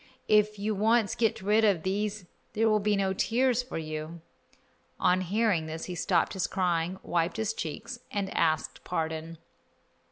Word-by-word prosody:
If 210 0 +3
you 210 +2 -1
once 220 +1 +2
get 225 -4 0
rid 210 +3 +3
of 195 -7 +3
these 205 +1 -2 0.3
there 225 +1 +2
will 215 -1 +4
be 210 0 +1
no 195 -1 +1
tears 245 +4 +2
for 250 -6 -6
you." 155 +1 -5 0.8
On 180 +1 +3
hearing 190 -3 +1
this 160 +1 -5
he 180 - -5
stopped 175 0 +1
his 185 -4 -1
crying, 180 -1 0
wiped 170 +3 0
his 220 0 -1
cheeks, 225 - -5
and 200 -2 -3
asked 160 -2 0
pardon. 160 -1 -3
195 Hz, 160 wpm, -29 LUFS, 165-215 Hz, 0.8 s, will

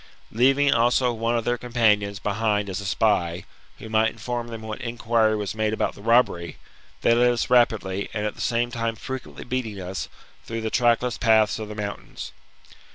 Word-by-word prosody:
Leaving 135 +5 +4
also 120 +1 +3
one 115 +1 0
of 115 - -3
their 120 0 0
companions 105 -4 +1
behind 105 0 -1
as 95 +2 -3
a - - -8
spy, 90 -4 +1 0.3
who - - -9
might 110 0 +2
inform 120 0 -5
them 115 -1 -8
what 110 -1 -6
in 120 0 -5
quiry 110 -2 +2
was 105 -2 -3
made 110 0 -1
about - - -1
the - - -14
robbery, 115 -7 +2 0.5
they 115 - +5
led 120 +1 +4
us 120 0 -1
rapidly, 105 -5 +2
and 105 -1 -3
at 105 - -2
the - - -10
same 120 +1 0
time 115 -1 -2
frequently 130 +3 -7
beating 120 -5 -3
us, 95 +1 -5 0.3
through 115 0 -5
the 110 0 -3
trackless 120 0 +2
paths 110 -2 +3
of 110 - -5
the 105 - -8
mountains. 100 -1 -6
110 Hz, 190 wpm, -24 LUFS, 105-120 Hz, 0.5 s, they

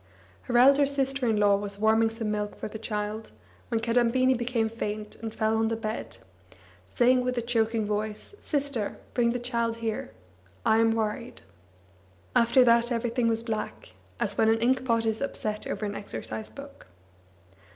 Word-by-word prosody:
Her 240 - +3
elder 275 +3 +6
sister 270 -2 -1
in 220 - +2
law 205 -1 +4
was 200 0 -5
warming 220 +1 +3
some 225 -1 -3
milk 210 0 -2
for - - -5
the 220 +1 -8
child, 210 0 -4 0.4
when 230 -2 0
Kadambini 245 +2 +3
became 240 -2 0
faint, 215 -1 -5
and 225 -1 -5
fell 220 0 0
on 225 0 +2
the 225 - 0
bed, 220 -1 -5 0.7
saying 250 0 +3
with 250 0 -2
a - - +1
choking 225 -2 0
voice: 210 - -3
"Sister, 280 -8 -2 0.2
bring 240 -1 +2
the 245 - -1
child 235 -2 -1
here. 225 - -3 0.6
I 220 - +4
am 225 0 +4
worried." 225 +2 -3 0.9
After 235 +2 +5
that 235 0 +4
everything 235 0 0
was 225 0 +1
black, 215 - -4 0.3
as 205 0 -1
when 220 - +5
an 225 - +4
inkpot 240 -1 +1
is 220 -1 -1
upset 215 -6 -3
over 215 - -3
an 205 - -3
exercise 210 +1 -6
book. 280 - -12
225 Hz, 165 wpm, -27 LUFS, 215-245 Hz, 0.9 s, elder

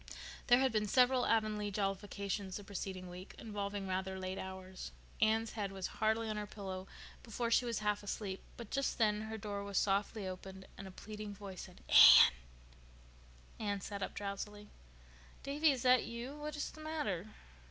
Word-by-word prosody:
There 245 - +7
had 265 0 +3
been 215 -1 +1
several 250 +2 +4
Avonlea 215 -2 +1
jollifications 200 -1 -2
the 205 - -8
preceding 190 -2 -5
week, 180 +2 -9
involving 205 -2 -4
rather 190 0 -2
late 185 0 -4
hours. 190 0 -7 0.3
Anne's 220 +1 +3
head 205 -3 -3
was 190 -1 -5 0.2
hardly 220 +1 +2
on 215 -1 -2
her 210 0 -3
pillow 190 -2 -6 0.3
before 230 +1 -3
she 245 - +4
was 235 -3 -1
half 210 0 +1
asleep; 200 -1 -4 0.2
but 235 -3 -9
just 275 0 0
then 210 -2 +2
her 220 0 -5
door 205 -2 -4
was 200 -2 -3
softly 200 +1 +1
opened 190 +1 -8
and 195 - -8
a - - -9
pleading 210 +1 -7
voice 195 -2 -8
said, 180 - -16
"Anne." - - +10 1.3
Anne 205 -2 -1
sat 200 +1 -5
up 190 - -4
drowsily. 205 +1 -5 0.7
"Davy, 290 +3 +2
is 265 -4 0
that 255 -1 +6
you? 235 +4 -6
What 300 0 -5
is 295 - -3
the 310 - -12
matter?" 215 - -2
205 Hz, 175 wpm, -35 LUFS, 195-225 Hz, 1.3 s, Anne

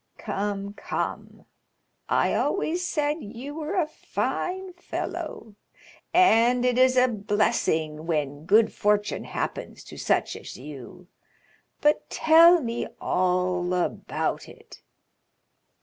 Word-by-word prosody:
"Come, 200 0 -3
come; - - -5 0.6
I - - +2
always 360 -3 0
said 300 -3 0
you 240 +7 -8
were 315 +4 -4
a 360 -4 +2
fine 365 +4 -3
fellow, 225 -9 -6 0.6
and 245 -8 +4
it 250 0 +2
is 255 0 +4
a 255 0 +6
blessing 165 -8 0
when 150 -1 -2
good 220 +3 +4
fortune 210 0 0
happens - - -5
to - - -12
such - - 0
as - - -9
you. 150 +6 -11 0.7
But 295 0 +2
tell 330 +2 +6
me 235 -2 -3
all 180 0 0
about 180 - -2
it?" 460 0 -15
230 Hz, 110 wpm, -25 LUFS, -, 0.7 s, a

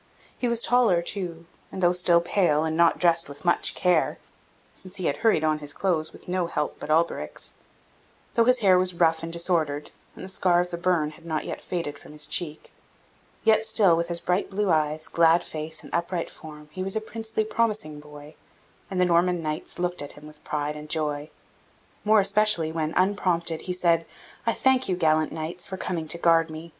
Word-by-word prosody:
He 250 - -2
was 235 -1 +1
taller 230 -8 +3
too; 170 -3 -3 0.3
and 190 - -5
though 175 - +5
still 180 -1 +4
pale, 170 -4 +2
and 160 0 -1
not 170 0 +4
dressed 170 -3 +2
with 140 +4 -11
much 175 - +2
care 180 -3 +2 0.6
(since 185 0 -8
he 185 - -3
had 140 - 0
hurried 220 -9 +2
on 155 -1 +1
his 145 -1 -5
clothes 165 -4 0
with - - -15
no 180 -1 -1
help 150 -3 -3
but - - -8
Alberic's) 165 +2 -1 0.8
though 230 - +3
his 250 0 +3
hair 185 -3 +5
was 185 -1 0
rough 165 -1 +2
and 165 0 -5
disordered, 165 -4 0 0.2
and - - -8
the - - -8
scar 180 -2 +2
of 180 0 -1
the 170 - -3
burn 170 -4 +1
had 160 +2 -17
not 160 -2 -3
yet - - -5
faded 155 -5 -4
from - - -14
his 150 0 0
check 155 -3 -2 0.7
yet 220 -1 +4
still, 215 -5 +4
with 170 +1 -1
his 170 0 -1
bright 180 +3 -1
blue 200 -1 0
eyes, 155 0 0
glad 170 +1 +4
face, 155 0 -6
and - - -13
upright 170 0 -2
form, 150 -1 -12
he 185 - -6
was 190 +2 -1
a - - +1
princely, 220 0 -3
promising 215 -9 -1
boy, 150 0 -12 0.6
and 190 - -3
the 180 - +4
Norman 175 0 +2
knights 155 0 -3
looked 180 -1 -2
at 145 - -7
him 150 - -14
with 150 0 -15
pride 150 0 -3
and 150 0 -9
joy, 150 -1 -2 0.7
more 215 0 +5
especially 200 -5 +2
when, 160 -1 -2
unprompted, 180 -4 +1
he 185 - -5
said: 170 -2 +2 0.4
"I - - +3
thank 260 -2 +2
you, 185 - +1
gallant 155 -2 +2
knights, 165 +2 -4
for 190 - -6
coming 170 -4 -3
to 170 - -1
guard 165 -1 +3
me. 160 +2 -8
170 Hz, 205 wpm, -25 LUFS, 155-185 Hz, 0.8 s, though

